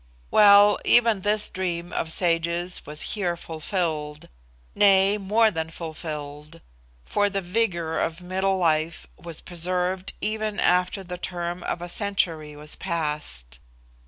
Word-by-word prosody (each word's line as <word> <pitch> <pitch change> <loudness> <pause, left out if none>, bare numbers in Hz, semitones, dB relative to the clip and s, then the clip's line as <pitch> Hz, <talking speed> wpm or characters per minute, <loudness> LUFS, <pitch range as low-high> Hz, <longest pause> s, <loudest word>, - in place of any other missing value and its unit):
Well, 205 0 +7
even 230 -4 +4
this 210 +2 +1
dream 175 -2 -4
of 160 - -2
sages 170 +1 0
was 150 0 -2
here 180 -5 -1
fulfilled 155 -3 -3 0.4
nay, 195 0 +5
more 215 +3 +3
than 160 -3 -3
fulfilled; 155 -1 -7 0.5
for 205 0 +1
the 200 0 -2
vigour 175 -4 -1
of 165 +1 -2
middle 190 +2 -1
life 160 -2 0 0.2
was 170 -2 -7
preserved 180 +2 -2
even 215 0 -2
after 180 +2 +2
the 180 -1 -7
term 175 -1 -4
of 175 - -4
a - - -5
century 170 -6 -1
was 150 +1 -4
passed. 150 - -4
175 Hz, 130 wpm, -25 LUFS, 160-195 Hz, 0.5 s, Well